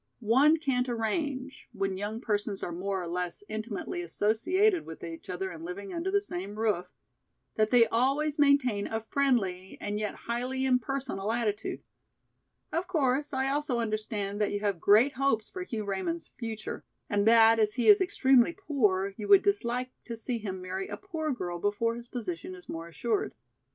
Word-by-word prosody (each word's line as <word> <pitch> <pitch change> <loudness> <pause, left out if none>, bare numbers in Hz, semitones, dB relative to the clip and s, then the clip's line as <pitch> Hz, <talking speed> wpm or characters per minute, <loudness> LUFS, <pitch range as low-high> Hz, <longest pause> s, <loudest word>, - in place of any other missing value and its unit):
One 300 +5 +6
can't 260 -5 0
arrange, 260 +4 -3
when 195 -2 -1
young 210 +4 -4
persons 205 -3 -1
are - - -3
more 190 +2 -2
or - - -5
less 175 +2 -3
intimately 220 - -4
associated 355 - +2
with 160 - -10
each 165 -1 -8
other 190 +1 -3
and 165 -1 -9
living 185 +3 -6
under 340 +2 -2
the 405 +1 +3
same 200 - -5
roof, 210 -5 0 0.7
that 215 0 +2
they 240 -1 +6
always 280 +6 +1
maintain 275 -8 +3
a 225 - -2
friendly 220 -7 0
and 205 0 -3
yet 210 -1 -2
highly 250 +3 -2
impersonal 255 -4 0
attitude. 225 -3 -2 0.9
Of 335 +3 -1
course 290 -5 +1
I 265 -1 0
also 280 -3 0
understand 215 -2 -2
that 210 - +1
you 205 - -2
have 200 -4 0
great 225 +7 +5
hopes 250 -5 0
for 370 - -6
Hugh 225 - -4
Raymond's 200 - -3
future, 225 -3 -5 0.2
and 205 +1 +1
that 225 0 +7
as 210 0 +2
he 245 - 0
is 410 -1 +8
extremely 270 -7 +4
poor 210 - 0
you 210 - -5
would 395 - +7
dislike 255 -11 0
to 230 - -5
see 235 +1 -2
him 190 -3 -5
marry 190 +1 -4
a - - -6
poor 320 -6 -3
girl 175 -9 -4
before 205 +4 0
his 235 +1 -8
position 185 -7 -5
is 180 - -14
more 165 0 -6
assured. 215 +6 -2
225 Hz, 175 wpm, -29 LUFS, 200-270 Hz, 0.9 s, is